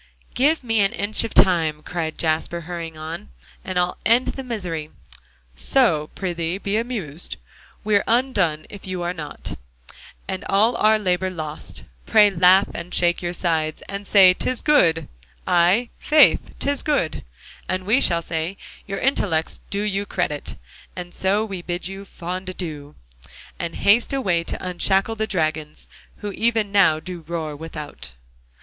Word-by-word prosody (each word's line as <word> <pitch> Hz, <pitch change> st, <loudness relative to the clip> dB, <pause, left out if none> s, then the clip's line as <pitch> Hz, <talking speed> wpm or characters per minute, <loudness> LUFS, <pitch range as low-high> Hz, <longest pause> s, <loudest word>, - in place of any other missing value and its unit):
"Give 295 Hz, +3 st, +2 dB
me 225 Hz, -2 st, +1 dB
an 195 Hz, -1 st, +3 dB
inch 205 Hz, +2 st, 0 dB
of 225 Hz, -, -5 dB
time," 160 Hz, -5 st, +4 dB
cried 165 Hz, -3 st, -4 dB
Jasper, 160 Hz, +1 st, -1 dB
hurrying 165 Hz, -1 st, -6 dB
on, 155 Hz, -, -7 dB, 0.3 s
"and 185 Hz, -1 st, -3 dB
I'll 180 Hz, 0 st, 0 dB
end 235 Hz, +5 st, +3 dB
the 270 Hz, -, -5 dB
misery: 180 Hz, -11 st, -4 dB, 0.7 s
"'So 155 Hz, -, +2 dB
prithee, 175 Hz, -2 st, -2 dB
be 200 Hz, +1 st, -2 dB
amused; 210 Hz, -, -3 dB, 0.5 s
We're 205 Hz, -2 st, +3 dB
undone, 205 Hz, -11 st, +1 dB
if 200 Hz, -2 st, -11 dB
you 185 Hz, -1 st, -3 dB
are 175 Hz, +1 st, -1 dB
not, 150 Hz, -, -7 dB, 0.7 s
And 190 Hz, -1 st, -4 dB
all 215 Hz, +5 st, +4 dB
our 215 Hz, 0 st, +4 dB
labor 185 Hz, -2 st, 0 dB
lost. 155 Hz, -, -7 dB, 0.2 s
Pray 210 Hz, -1 st, +6 dB
laugh, 185 Hz, +2 st, +5 dB
and 175 Hz, -, -7 dB
shake 175 Hz, 0 st, +3 dB
your 175 Hz, -1 st, -3 dB
sides, 160 Hz, -3 st, -1 dB
And 200 Hz, 0 st, -6 dB
say 190 Hz, -3 st, +7 dB
"'tis 255 Hz, +6 st, -2 dB
good; 165 Hz, -, +3 dB, 0.4 s
I' 180 Hz, +8 st, +3 dB
faith, 305 Hz, 0 st, +4 dB
'tis 285 Hz, -1 st, 0 dB
very 295 Hz, -2 st, +1 dB
good." -, -, -8 dB, 0.5 s
And 185 Hz, 0 st, -2 dB
we 230 Hz, +7 st, +3 dB
shall 170 Hz, -1 st, +2 dB
say 165 Hz, +4 st, -3 dB, 0.3 s
"Your 195 Hz, 0 st, -3 dB
intellects 185 Hz, -, 0 dB
do 200 Hz, +1 st, -2 dB
you 200 Hz, -1 st, -1 dB
credit." 150 Hz, -5 st, -2 dB, 0.4 s
And 175 Hz, -1 st, -7 dB
so 200 Hz, +3 st, +1 dB
we 195 Hz, -4 st, -6 dB
bid 175 Hz, 0 st, -4 dB
you 195 Hz, +1 st, -7 dB
a -, -, -11 dB
fond 185 Hz, +1 st, -6 dB
adieu, 155 Hz, -6 st, -6 dB, 0.6 s
And 170 Hz, -1 st, -4 dB
haste 225 Hz, +6 st, +3 dB
away 190 Hz, -11 st, +1 dB
to 185 Hz, -, -4 dB
unshackle 190 Hz, +4 st, +1 dB
the 220 Hz, +1 st, -1 dB
dragons, 155 Hz, -5 st, -2 dB, 0.3 s
Who 205 Hz, -, -4 dB
even 220 Hz, -1 st, 0 dB
now 185 Hz, -6 st, +4 dB
do 175 Hz, +1 st, -7 dB
roar 160 Hz, -3 st, -3 dB
without.'" 150 Hz, -, -8 dB
185 Hz, 155 wpm, -22 LUFS, 165-205 Hz, 0.7 s, say